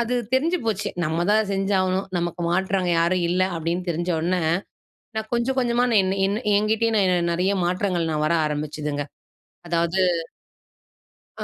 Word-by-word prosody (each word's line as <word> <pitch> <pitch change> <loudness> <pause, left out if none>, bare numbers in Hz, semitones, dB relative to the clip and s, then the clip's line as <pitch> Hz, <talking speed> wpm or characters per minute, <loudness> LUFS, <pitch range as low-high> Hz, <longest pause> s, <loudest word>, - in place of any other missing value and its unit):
அது 235 +1 0 0.2
தெரிஞ்சு 330 +7 +2
போச்சு 210 -2 -1 0.2
நம்மதான் 185 +7 +1
செஞ்சாகணும், 195 -1 0
நமக்கு 175 0 -3
மாற்றா 190 +2 +1
அங்க 180 - 0
யாரும் 175 +2 +2
இல்ல 180 +2 +1
அப்படின்னு 165 +2 -2
தெரிஞ்ச 175 +2 -2
உடனே, 180 +2 0 0.8
நா 220 - 0
கொஞ்சம் 240 +3 0
கொஞ்சமா 240 -1 +1
நா - - +2
என் 190 0 0
என் 200 +2 0 0.2
என்கிட்டேய 210 -3 +2
நிறைய 180 +3 +1
மாற்றங்கள் 180 -2 0
நா - - -1
வர 170 +2 +2
ஆரம்பிச்சுதுங்க. 150 -1 -3 0.6
அதாவது 170 +2 0 1.4
ஆ - - -1
185 Hz, 140 wpm, -23 LUFS, 170-210 Hz, 1.4 s, தெரிஞ்சு